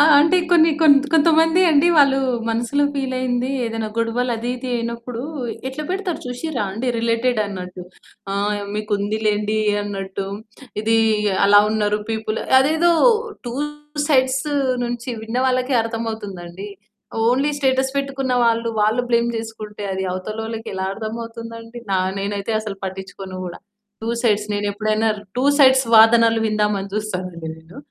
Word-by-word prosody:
ఆ! -, -, +8 dB, 0.2 s
అంటే 320 Hz, +5 st, +4 dB
కొన్ని 330 Hz, -2 st, +6 dB
కొంత్ 285 Hz, -3 st, +6 dB
కొంతమంది 325 Hz, +2 st, +4 dB
అండి 310 Hz, +3 st, +4 dB
వాళ్ళు 275 Hz, -2 st, +5 dB, 0.3 s
మనసులో 240 Hz, +5 st, 0 dB
ఫీలయింది 255 Hz, -2 st, -1 dB
ఏదైనా 225 Hz, -1 st, -3 dB
గొడవలు 235 Hz, +2 st, 0 dB
అది 235 Hz, +2 st, -3 dB
ఇది 255 Hz, +1 st, -6 dB
అయినప్పుడు 235 Hz, +1 st, -5 dB, 0.5 s
ఎట్లా 265 Hz, +3 st, -6 dB
పెడతారు 370 Hz, -2 st, -2 dB
చూషిర్రా 250 Hz, 0 st, -3 dB
అండి. 225 Hz, +6 st, -4 dB
రిలేటెడ్ 230 Hz, +1 st, +1 dB
అన్నట్టు. 185 Hz, -2 st, -7 dB, 0.5 s
ఆ! -, -, -2 dB, 0.4 s
మీకు 210 Hz, 0 st, -4 dB
ఉందిలెండి 210 Hz, +1 st, 0 dB, 0.2 s
అన్నట్టు. 195 Hz, -1 st, -5 dB, 0.5 s
ఇదీ, 225 Hz, +1 st, +2 dB, 0.5 s
అలా 205 Hz, +1 st, +7 dB
ఉన్నారు 210 Hz, -1 st, +1 dB
పీపుల్ 220 Hz, 0 st, -2 dB, 0.2 s
అదేదో 320 Hz, +5 st, +3 dB, 0.6 s
టూ 240 Hz, -, -4 dB, 0.5 s
సైడ్స్ 260 Hz, 0 st, +2 dB, 0.4 s
నుంచి 240 Hz, +1 st, -5 dB
విన్న 225 Hz, +2 st, -4 dB
వాళ్ళకి 255 Hz, +1 st, +1 dB
అర్థమవుతుందండి. 205 Hz, -5 st, -6 dB, 0.6 s
ఓన్లీ 275 Hz, +4 st, +2 dB
స్టేటస్ 265 Hz, -1 st, +1 dB
పెట్టుకున్న 275 Hz, -1 st, -2 dB
వాళ్ళు, 230 Hz, 0 st, +1 dB
వాళ్ళు 215 Hz, +4 st, +2 dB
బ్లేమ్ 235 Hz, 0 st, +3 dB
జేసుకుంటే 215 Hz, -2 st, -7 dB
అది 190 Hz, -, -3 dB
అవతలోళ్ళకి 220 Hz, +4 st, -5 dB
ఎలా 190 Hz, 0 st, -2 dB
అర్థమవుతుందండి. 230 Hz, +1 st, -7 dB
నా 190 Hz, -, +3 dB, 0.2 s
నేనైతే 200 Hz, +2 st, -3 dB
అసలు 210 Hz, -2 st, -6 dB
పట్టిచ్చుకోను 190 Hz, 0 st, -7 dB
గూడా. 175 Hz, -, -8 dB, 0.4 s
Two 225 Hz, -, -3 dB
sides. 210 Hz, -3 st, +2 dB
నేనెప్పుడైనా 215 Hz, +2 st, 0 dB, 0.3 s
టూ 255 Hz, -, +1 dB
సైడ్స్ 265 Hz, -2 st, +6 dB
వాదనలు 225 Hz, 0 st, +6 dB
విందామని 210 Hz, -2 st, 0 dB
చూస్తానండి 185 Hz, -6 st, -4 dB
నేను. 160 Hz, +6 st, -16 dB
230 Hz, 130 wpm, -20 LUFS, 210-260 Hz, 0.6 s, ఆ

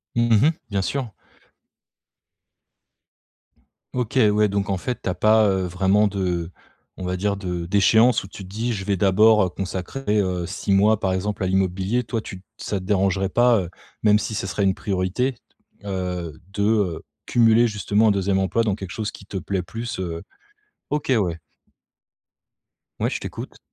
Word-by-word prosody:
Mmh 120 Hz, 0 st, +4 dB
mh. -, -, +4 dB, 0.2 s
Bien 100 Hz, -2 st, 0 dB
sûr. 130 Hz, +4 st, -2 dB, 2.8 s
OK, 125 Hz, 0 st, -2 dB
ouais 105 Hz, 0 st, +3 dB
donc 100 Hz, 0 st, -1 dB
en 95 Hz, -, 0 dB
fait, 125 Hz, +7 st, -4 dB
tu -, -, -2 dB
as 90 Hz, -, -1 dB
pas, 110 Hz, +3 st, +4 dB
heu, 95 Hz, -1 st, 0 dB
vraiment 95 Hz, +4 st, +2 dB
de 90 Hz, -4 st, -2 dB, 0.5 s
on 95 Hz, -, -6 dB
va 90 Hz, 0 st, -2 dB
dire 100 Hz, +1 st, -1 dB
de 90 Hz, -3 st, -4 dB
d'échéance 110 Hz, +6 st, +4 dB
où -, -, -9 dB
tu 95 Hz, 0 st, -10 dB
te -, -, -11 dB
dis: 115 Hz, +4 st, -2 dB
«Je 95 Hz, -3 st, -5 dB
vais 100 Hz, -1 st, 0 dB
d'abord, 105 Hz, +2 st, +5 dB
heu, 90 Hz, -, 0 dB
consacrer, 100 Hz, +5 st, -2 dB
heu, 90 Hz, -2 st, -2 dB
6 100 Hz, -, -3 dB
mois 105 Hz, +2 st, +4 dB
par 95 Hz, -, 0 dB
exemple 100 Hz, +1 st, -2 dB
à -, -, +1 dB
l'immobilier» 95 Hz, +5 st, 0 dB
toi, 115 Hz, -1 st, -3 dB
tu 95 Hz, -3 st, -9 dB
te -, -, -36 dB
ça 100 Hz, -, -3 dB
te 95 Hz, -, -10 dB
dérangerait 95 Hz, -1 st, +1 dB
pas, 120 Hz, +2 st, +4 dB
heu, 85 Hz, -, -6 dB, 0.3 s
même 105 Hz, -1 st, +5 dB
si 110 Hz, -, -4 dB
ce 100 Hz, -, -2 dB
serait 100 Hz, +1 st, -2 dB
une 95 Hz, -1 st, +2 dB
priorité, 100 Hz, +6 st, -1 dB, 0.5 s
heu, 90 Hz, -5 st, -4 dB
de, 100 Hz, -, -2 dB
heu, 100 Hz, -6 st, +1 dB, 0.2 s
cumuler 115 Hz, 0 st, +4 dB
justement 105 Hz, 0 st, +2 dB
un -, -, +5 dB
2e 100 Hz, -1 st, +1 dB
emploi 95 Hz, +4 st, +1 dB
dans 105 Hz, -4 st, 0 dB
quelque 95 Hz, -3 st, -8 dB
chose 105 Hz, +1 st, -3 dB
qui 100 Hz, -, -13 dB
te 95 Hz, -, -6 dB
plaît 95 Hz, 0 st, -2 dB
plus, 115 Hz, +6 st, -6 dB
heu 85 Hz, -2 st, -4 dB, 0.7 s
OK, 150 Hz, -2 st, -1 dB
ouais. 90 Hz, -7 st, 0 dB, 1.6 s
Ouais, -, -, +1 dB
je -, -, -3 dB
t'écoute. -, -, -8 dB
100 Hz, 180 wpm, -23 LUFS, 95-110 Hz, 2.8 s, d'abord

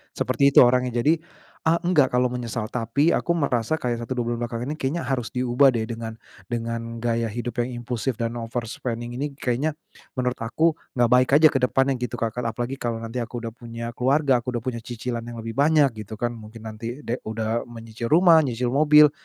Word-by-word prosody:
seperti 140 Hz, 0 st, +2 dB
itu -, -, +10 dB
orangnya. 125 Hz, -1 st, +2 dB
Jadi 160 Hz, +2 st, +3 dB, 0.5 s
a 160 Hz, -, +5 dB
enggak 150 Hz, -8 st, +3 dB
kalau 125 Hz, 0 st, +2 dB
menyesal. 120 Hz, -2 st, -4 dB
Tapi, 125 Hz, +7 st, +1 dB
aku 170 Hz, -, +1 dB
merasa 130 Hz, -3 st, +1 dB
kayak 120 Hz, -6 st, -2 dB
1, 125 Hz, +2 st, -4 dB
2, 120 Hz, -, 0 dB
bulan 120 Hz, -, -2 dB
belakang 120 Hz, 0 st, -3 dB
ini 155 Hz, -, -6 dB
kayaknya 150 Hz, +6 st, -1 dB
harus 125 Hz, -2 st, -1 dB
diubah 125 Hz, +2 st, +4 dB
deh 110 Hz, -, 0 dB
dengan 115 Hz, 0 st, -5 dB, 0.3 s
dengan 115 Hz, 0 st, -3 dB
gaya 115 Hz, -1 st, +1 dB
hidup 120 Hz, +2 st, -4 dB
yang 120 Hz, 0 st, -2 dB
impulsif 125 Hz, +1 st, -2 dB
dan 115 Hz, +1 st, -3 dB
overspending 120 Hz, +1 st, -4 dB
ini 145 Hz, -1 st, -3 dB
kayaknya 135 Hz, +4 st, -1 dB, 0.4 s
menurut 125 Hz, -1 st, -1 dB
aku 155 Hz, +8 st, +1 dB, 0.2 s
enggak 120 Hz, -1 st, +3 dB
baik 125 Hz, 0 st, +5 dB
aja 155 Hz, +1 st, +8 dB
ke 135 Hz, -, +1 dB
depannya, 135 Hz, +1 st, +1 dB
gitu, 125 Hz, -2 st, -3 dB
Kak. 115 Hz, +1 st, -2 dB
Apalagi, 120 Hz, +3 st, -3 dB
kalau 115 Hz, -1 st, -3 dB
nanti 115 Hz, +2 st, -4 dB
aku 120 Hz, 0 st, -5 dB
udah 115 Hz, -, -4 dB
punya 115 Hz, 0 st, -7 dB
keluarga, 130 Hz, +1 st, +2 dB
aku 125 Hz, +1 st, -4 dB
udah 120 Hz, -, -3 dB
punya 120 Hz, -2 st, -3 dB
cicilan 120 Hz, +1 st, -4 dB
yang 115 Hz, -1 st, -7 dB
lebih 115 Hz, -, -4 dB
banyak, 145 Hz, -2 st, +5 dB, 0.2 s
gitu 110 Hz, -, -7 dB
kan. 120 Hz, +2 st, -1 dB
Mungkin 110 Hz, 0 st, -11 dB
nanti 115 Hz, +5 st, -6 dB
de 120 Hz, +2 st, -3 dB
udah 110 Hz, +1 st, -2 dB
menyicil 115 Hz, 0 st, -7 dB
rumah, 165 Hz, +1 st, +6 dB
nyicil 125 Hz, -4 st, -1 dB
mobil 150 Hz, +1 st, +6 dB
120 Hz, 200 wpm, -24 LUFS, 115-135 Hz, 0.5 s, itu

